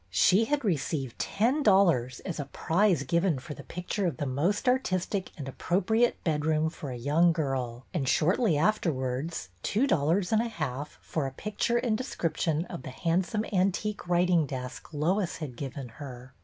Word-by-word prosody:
She 180 - +4
had 285 0 0
received 140 - -1
ten 245 +9 +1
dollars 170 - +3
as 175 -4 -5
a 145 - -2
prize 170 +3 +1
given 170 -1 +1
for 150 +4 -7
the - - -9
picture 180 +3 -2
of 150 -7 -3
the 145 - -2
most 155 - 0
artistic 195 -6 +1
and 140 -3 -6
appropriate 205 - +1
bedroom 155 0 +1
for 145 - -7
a 125 - -5
young 150 +8 +3
girl, 130 -6 -2
and 140 -8 0
shortly 180 - +3
afterwards 145 - 0
two 225 +7 +1
dollars 175 - +2
and 220 0 +4
a 235 - -1
half 150 - -4
for 150 -4 -2
a - - -5
picture 210 - -1
and 235 -3 0
description 165 - -1
of 175 - -7
the 130 - -7
handsome 180 - 0
antique 195 +1 0
writing 175 -3 +3
desk 130 +1 -6
Lois 170 +5 0
had 150 -7 -6
given 135 0 -6
her. 130 0 -10
165 Hz, 170 wpm, -29 LUFS, 140-195 Hz, -, She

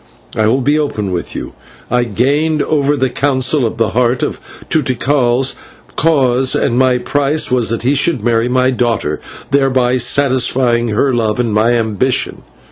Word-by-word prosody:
I 110 0 +1
will 130 +5 +1
be 145 +4 +1
open 105 -10 -3
with 90 -1 -5
you. - - -6 0.4
I 125 0 +1
gained 145 +8 0
over 145 -1 0
the 130 -2 0
Council 130 0 +1
of 115 - -7
the 115 -1 +1
Heart 125 +1 0
to 160 - -3
Tikal's 130 -1 0 0.4
cause, 130 -5 +2
and 120 - 0
my 130 0 +3
price 145 +4 -1
was 125 -3 +1
that 115 0 -3
he 130 +3 +2
should 140 -4 +1
marry 115 0 +1
my 130 +1 +2
daughter, 115 - -1 0.3
thereby 130 -2 +2
satisfying 125 -2 +2
her 120 +5 0
love 110 -1 -1
and 115 -3 0
my 110 +3 +2
ambition. 115 +3 -1
125 Hz, 160 wpm, -14 LUFS, 120-135 Hz, 0.4 s, my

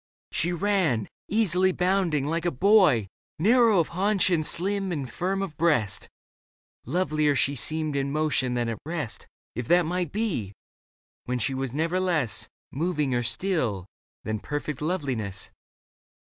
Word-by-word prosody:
She 175 - +1
ran, 175 - +1 0.2
easily 190 -3 +3
bounding, 180 -6 +1
like 165 +3 -2
a - - +3
boy, 170 - +4 0.3
Narrow 225 +4 +4
of 170 - +2
haunch 190 +2 +2
and 165 -3 +2
slim 195 +4 +1
and 145 -6 -3
firm 190 +9 -2
of 170 -6 -6
breast. 145 - +1 0.8
Lovelier 155 -2 +1
she 140 +2 +2
seemed 155 +2 0
in 140 0 -1
motion 145 -4 0
than 120 -1 0
at 115 -2 -4
rest. 155 -6 -5 0.3
If 120 0 -5
that 175 0 +4
might 175 -1 -2
be, 175 - -2 0.7
when 125 0 -1
she 125 +3 -1
was 130 -1 -3
never 165 +6 0
less. 165 -11 0 0.2
Moving 150 -3 -1
or 120 - +1
still, 120 - -1 0.4
than 110 0 -3
perfect 145 +2 -4
loveliness. 130 - -2
155 Hz, 145 wpm, -26 LUFS, 130-185 Hz, 0.8 s, boy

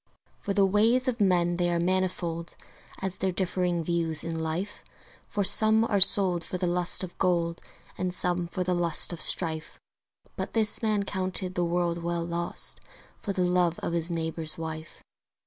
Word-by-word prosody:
For 200 - -5
the 200 -1 +3
ways 225 +6 +3
of 240 -3 -3
men 175 -3 +1
they 175 -1 -1
are 170 -1 -1
manifold 175 -2 -3 0.5
As 190 -1 -4
their 190 0 -1
differing 180 -2 -2
views 165 -2 -2
in 165 -1 -5
life; 165 +6 -5 0.4
For 205 - -3
some 220 +3 +7
are 205 -3 -1
sold 185 -3 +5
for 185 - -6
the 180 - -3
lust 175 +1 +2
of 180 - -9
gold 170 -2 -1 0.4
And 185 -1 -3
some 175 -1 -2
for 180 +2 -4
the 180 0 -2
lust 175 0 +2
of 170 - -4
strife: 160 -3 +4 0.6
But - - -6
this 220 -2 0
man 215 -3 0
counted 185 -1 -4
the 175 - -2
world 170 0 -2
well 170 0 -4
lost 170 0 +1 0.4
For 200 - -5
the 185 -2 -2
love 180 -1 0
of - - -5
his 170 0 -3
neighbour's 160 -1 -1
wife. 160 -1 -8
175 Hz, 175 wpm, -25 LUFS, 170-190 Hz, 0.6 s, some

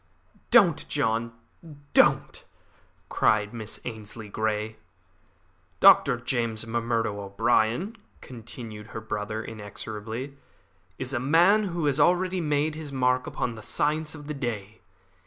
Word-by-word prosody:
"Don't, - - +5
John, 115 +1 0 0.6
don't!" - - +3 0.6
cried 105 0 +2
Miss 110 -2 -6
Ainslie 110 -2 -7
Grey. 110 +1 -2 1.0
"Dr. 125 - +7
James 115 -3 -1
M'Murdo 115 -2 -1
O'Brien," 115 - +1 0.2
continued 115 -3 -9
her 115 - -6
brother 110 0 -4
inexorably, 110 +4 -7 0.6
"is 130 +1 -5
a 120 - 0
man 175 - +4
who 170 -4 -2
has 145 0 +1
already 180 +4 +3
made 150 0 +1
his 155 -2 -7
mark 125 -1 +1
upon 120 - -2
the 110 - -10
science 150 +6 -1
of 150 -1 -10
the 150 - -4
day. 110 -6 -5
115 Hz, 120 wpm, -26 LUFS, 110-145 Hz, 1.0 s, Dr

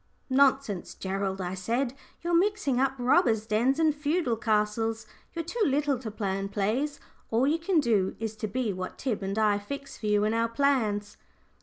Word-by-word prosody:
"Nonsense, 265 -7 +2
Gerald!" 195 0 -2
I 180 -1 -3
said. 235 +7 -1 0.3
"You're 345 0 -1
mixing 345 -8 +2
up 270 0 +2
robbers' 245 -3 +3
dens 235 +5 +2
and 315 -2 +3
feudal 295 -3 0
castles. 220 0 0 0.3
You're 330 -1 -4
too 460 +8 -4
little 285 -4 +1
to 235 -3 -5
plan 195 -2 -2
plays. 230 +9 -1 0.3
All 230 +3 +2
you 310 +4 +2
can 335 0 +2
do 215 -9 +1
is 220 -1 -3
to 215 - -3
be 220 0 -1
what 185 0 -6
Tib 245 -7 -2
and 195 +2 -3
I 210 -2 +3
fix 275 +6 -7
for 215 - -4
you 210 0 +3
in 215 +1 +1
our 230 0 +1
plans." 230 -6 0
230 Hz, 180 wpm, -28 LUFS, 210-280 Hz, 0.3 s, robbers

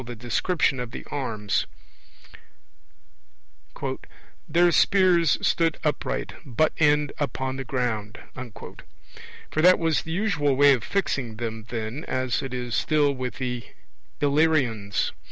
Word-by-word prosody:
the 120 0 -7
description 130 +5 0
of 125 -1 -4
the - - -8
arms: 110 - -1 2.8
'their 175 +1 +4
spears 180 -5 +4
stood 165 -2 +2
upright, 150 -2 -2
butt 140 +4 +1
end 150 -2 +3
upon 130 -2 -2
the 135 - -4
ground'; 120 -5 -2 1.3
for 155 - +1
that 180 +2 +7
was 165 -2 +1
the 160 - -7
usual 165 -7 +1
way 145 +1 +6
of 120 -5 -1
fixing 135 - -1
them 110 -1 -5
then, 115 +5 -4
as 130 -2 -1
it 135 - -5
is 125 -2 -4
still 150 0 +2
with 130 -2 -4
the 125 -2 -3 0.6
Illyrians. 140 -9 +1
135 Hz, 120 wpm, -25 LUFS, 120-155 Hz, 2.8 s, that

